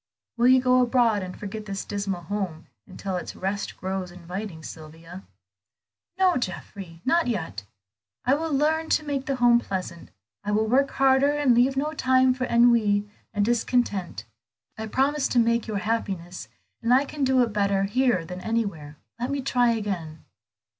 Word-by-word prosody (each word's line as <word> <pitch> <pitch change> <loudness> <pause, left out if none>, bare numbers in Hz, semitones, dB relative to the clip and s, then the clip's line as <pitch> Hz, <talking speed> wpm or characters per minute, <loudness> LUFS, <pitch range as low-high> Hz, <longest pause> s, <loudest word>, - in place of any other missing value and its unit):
Will 240 +1 +3
you 260 0 +7
go 255 0 +4
abroad, 235 -4 +2
and 185 -1 -7
forget 210 +1 -6
this 195 0 -4
dismal 200 -3 -3
home 175 -3 -4 0.2
until 185 0 -4
its 180 - -6
rest 195 +2 -3
grows 190 -1 -4
inviting, 180 0 -7
Sylvia?" 165 +4 -10 1.0
"No, 375 -4 +3
Geoffrey, 185 -5 -6
not 335 +3 +2
yet. 160 - -3 0.6
I 255 - +4
will 320 +2 -1
learn 315 +3 +1
to 310 - +1
make 280 -2 -3
the 275 - 0
home 240 -1 +5
pleasant, 185 -6 -5 0.3
I 205 +1 -2
will 215 +1 +2
work 270 +5 +2
harder, 270 +1 +3
and 290 -4 +3
leave 255 +3 +3
no 300 +3 -1
time 260 -3 +3
for 255 0 -3
ennui 230 -4 +3 0.2
and 205 -1 0
discontent. 225 - 0 0.5
I 220 0 -5
promised 275 +5 +1
to 245 - +4
make 230 0 +2
your 215 -2 -2
happiness, 195 -5 -3 0.3
and 230 +1 0
I 265 +3 +5
can 290 0 -4
do 260 -1 +4
it 230 -3 -3
better 200 -1 +1
here 210 -3 +1
than 180 +2 -7
anywhere. 200 -11 -3 0.2
Let 245 +2 -2
me 280 0 -1
try 245 -2 +2
again." 190 -9 -3
220 Hz, 165 wpm, -25 LUFS, 190-255 Hz, 1.0 s, you